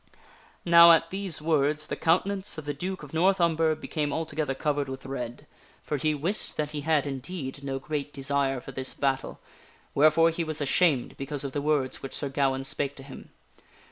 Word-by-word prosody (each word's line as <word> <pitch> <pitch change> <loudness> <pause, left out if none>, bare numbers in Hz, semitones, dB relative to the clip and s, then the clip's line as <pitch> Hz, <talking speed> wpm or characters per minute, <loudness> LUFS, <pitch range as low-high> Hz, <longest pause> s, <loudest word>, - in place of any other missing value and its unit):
Now 170 0 +9
at 165 0 +2
these 190 -5 -1
words 155 -1 +1
the - - -4
countenance 190 +3 0
of 155 - -7
the 145 - -2
Duke 185 +4 -5
of 150 - -11
North 185 +4 +3
Umber 165 -2 +2
be - - -10
came 150 -2 -2
altogether 150 -2 -2
covered 145 -1 -1
with 135 0 -7
red, 125 -3 -6 0.4
for 150 - -2
he 155 +2 0
wist 170 +9 0
that 150 -1 -2
he 150 -1 -4
had, 150 -1 +1
indeed, 140 0 -5
no 135 -1 -3
great 145 +1 -4
desire 135 -1 0
for 135 - -10
this 130 0 -1
battle, 135 -1 -2 0.5
wherefore 155 +3 +4
he 165 +1 -2
was 155 -1 -1
ashamed 145 -2 +2
because 140 +1 -2
of 140 - -3
the 145 - -3
words 145 -3 0
which 135 - -5
Sir 140 - -2
Gawaine 135 -1 0
spake 140 +1 -2
to 135 - -10
him. 135 -1 -12
145 Hz, 195 wpm, -27 LUFS, 135-160 Hz, 0.5 s, Now